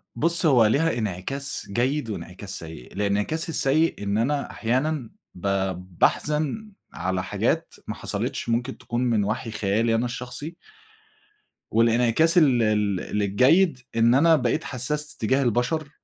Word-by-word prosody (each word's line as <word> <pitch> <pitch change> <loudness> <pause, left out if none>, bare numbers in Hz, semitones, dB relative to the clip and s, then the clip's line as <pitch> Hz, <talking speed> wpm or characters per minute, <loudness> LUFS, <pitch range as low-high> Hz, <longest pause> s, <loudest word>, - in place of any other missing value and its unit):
بُص، 170 +2 +2
هو 130 -7 +5
ليها 145 +7 +1
إنعكاس 115 +7 -3
جيد 125 +4 -1
وإنعكاس 95 -1 -6
سيئ. 80 -6 -11
الإنعكاس 105 - -1
السيئ 155 -4 +1
إن 100 +1 -1
أنا 140 +5 -1
أحيانًا 130 +2 -1 0.3
ب 90 +2 -5 0.5
باحزن 155 +9 0 0.2
على 95 +1 -2
حاجات - - -1
محصلتش - - -3
ممكن 120 +3 -1
تكون 120 0 -4
من 115 -4 +1
وحي 110 +3 -3
خيالي 110 +2 0
أنا 115 +2 0
الشخصي 125 +6 -5 1.2
والإنعكاس 120 - +3
ال 135 -8 +4
ال 105 -1 0
الجيد 130 - +3 0.2
إن 115 +1 +4
أنا 160 +5 +5
بقيت 125 -5 0
حسّاس 145 +3 +2
تجاه 130 +5 +1
البشر، 125 +6 -1
120 Hz, 125 wpm, -24 LUFS, 105-150 Hz, 1.2 s, هو